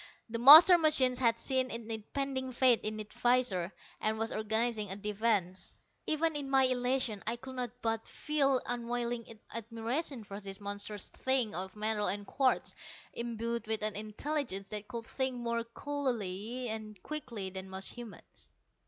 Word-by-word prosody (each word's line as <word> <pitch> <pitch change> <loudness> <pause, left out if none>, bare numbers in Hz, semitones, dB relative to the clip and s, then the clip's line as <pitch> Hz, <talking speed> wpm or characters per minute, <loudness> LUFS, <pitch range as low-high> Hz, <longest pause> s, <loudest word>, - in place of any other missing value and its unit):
The 230 +1 -3
master 315 +8 +11
machine 280 -6 +3
had 235 -2 +2
seen 260 +1 0
its 230 -1 -5
impending 260 +4 -3
fate 245 -1 +4
in 215 0 -3
the 215 - -4
visors, 240 -8 +1 0.3
and 215 0 0
was 225 +1 -2
organizing 220 0 -1
a 190 - -3
defense. 205 -3 -1 0.3
Even 315 0 +1
in 285 -2 -3
my 270 -1 +5
elation, 250 -4 +1
I 230 - +1
could 260 +2 -10
not 250 -1 -2
but 225 -1 -1
feel 275 -4 +1
unwilling 235 -1 -3
admiration 230 +4 -3
for 200 0 -8
this 195 -1 -7
monstrous 205 0 -4
thing 260 -5 0
of 190 +2 -5
metal 210 0 0
and 205 0 -1
quartz, 260 +4 +1 0.4
imbued 235 -1 -3
with 220 -1 -1
an 215 -1 0
intelligence 215 0 -3
that 210 -1 -5
could 235 -2 -6
think 260 +1 -2
more 235 -1 -2
coolly 240 -3 -3
and 215 -2 -6
quickly 235 -11 -5
than 190 0 -6
most 190 0 -5
humans. 235 -6 -11
230 Hz, 155 wpm, -32 LUFS, 210-255 Hz, 0.4 s, master